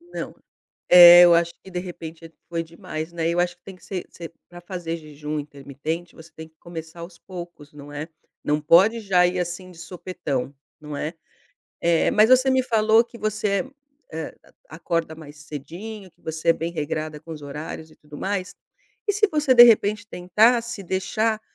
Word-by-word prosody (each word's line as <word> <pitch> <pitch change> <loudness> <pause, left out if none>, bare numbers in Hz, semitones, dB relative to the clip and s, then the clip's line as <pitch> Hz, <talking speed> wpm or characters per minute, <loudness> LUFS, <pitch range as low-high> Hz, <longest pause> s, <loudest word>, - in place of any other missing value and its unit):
Não. 345 +1 -8 0.5
É, 175 0 +10
eu 175 -1 +7
acho 170 0 +2
que, 190 - -13
de 180 - -4
repente, 165 -2 -9 0.2
foi 170 -1 -2
demais, 160 0 -7
né. 165 -1 -1
Eu 175 +1 +1
acho 175 0 -1
que 180 - -45
tem 195 - -10
que 180 - -21
se 185 -3 -5
ser 165 -1 -10 0.2
pra 175 0 -12
fazer 175 -2 -5
jejum 150 -1 -6
intermitente, 145 +4 -6
você 160 0 -15
tem 160 0 -10
que 160 - -37
começar 165 0 -9
aos 170 0 -10
poucos, 175 -5 -10
não 145 0 -12
é. 145 +2 -6 0.4
Não 150 +1 +1
pode 190 +9 +5
já 185 -4 +3
ir 180 +1 -2
assim, 180 +1 -5
de 170 - -16
supetão, 165 -6 -5 0.3
não 150 -1 -7
é. 155 +3 -4 0.7
Eh, 170 -1 +2
mas 215 +2 +4
você 255 +1 +5
me 260 0 +3
falou 225 -1 +3
que 235 0 -14
você, 215 +3 -1 0.4
eh, 160 -1 -6 0.3
acorda 165 0 -3
mais 155 -2 -13
cedinho, 175 +8 -9
que - - -36
você 160 +1 -5
é - - +8
bem 165 +1 -4
regrada 155 -1 -4
com 165 - -14
os 150 - -9
horários 150 +2 -7
e 155 - -20
tudo 150 -1 -13
mais, 190 +1 -3 0.5
e 410 - +2
se 420 0 +2
você 300 -4 +2
de 240 - +10
repente 210 -2 +3
tentasse 225 +4 +1
deixar 215 +4 -1
170 Hz, 185 wpm, -23 LUFS, 160-200 Hz, 0.7 s, É